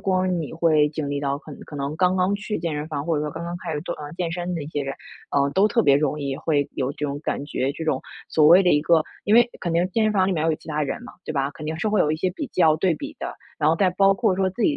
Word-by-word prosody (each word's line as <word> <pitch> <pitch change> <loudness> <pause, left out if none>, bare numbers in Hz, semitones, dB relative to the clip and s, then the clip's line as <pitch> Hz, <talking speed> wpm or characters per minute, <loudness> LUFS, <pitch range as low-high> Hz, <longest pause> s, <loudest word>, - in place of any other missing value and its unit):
光 185 -2 +1
你 155 +1 -6
会 155 -3 +3
经 150 -1 -4
历 145 0 -2
到， 140 -1 -1
可- 155 0 -12
可 150 - -9
能 140 +1 -3
刚 185 0 +3
刚 185 +2 +2
去 210 +1 -3
健 165 -2 -2
身 150 +1 -4
房， 145 -2 -3
或 165 -1 0
者 150 - 0
说 150 - -3
刚 165 +3 -6
刚 170 +1 -4
开 160 - -3
始 150 - -2
做， - - -4
呃， 145 -1 -8
健 170 -2 -2
身 175 +1 -3
的 160 - -3
一 - - -7
些 145 -2 -2
人， 135 0 -4 0.4
呃， 140 0 +2
都 195 +7 +3
特 230 +1 +2
别 140 - +5
容 150 +1 +1
易 140 -2 -2
会 145 -1 0
有 130 0 -1
这 150 - -5
种 140 +1 -4
感 145 - -3
觉。 140 -2 -2
这 160 +2 -6
种 140 -4 0 0.3
所 155 -1 +4
谓 175 +5 +8
的 180 - +3
一 150 - +4
个 160 0 +3 0.2
因 210 - +3
为 240 0 +6
肯 175 - -2
定 170 +2 +2
健 220 +3 +1
身 215 - +2
房 190 -2 +3
里 195 - +1
面 155 -3 -1
要 165 - +2
有 155 - 0
其 165 - -20
他 155 -1 -1
人 150 - -3
嘛， - - -10
对 - - -3
吧？ 140 -1 0
肯 150 +1 -9
定 160 +1 -3
是 215 - 0
会 210 - +2
有 150 - +3
一 155 - 0
些 185 +3 0
比 245 +11 -5
较、 160 -9 +3
对 175 +1 +2
比 - - -7
的。 - - -5 0.2
然 150 - +3
后 165 - +2
再 185 0 +3
包 195 +2 +4
括 205 -2 +1
说 190 0 +1
自 190 - -10
己 290 - +3
160 Hz, 350 characters per minute, -23 LUFS, 150-185 Hz, 0.4 s, 谓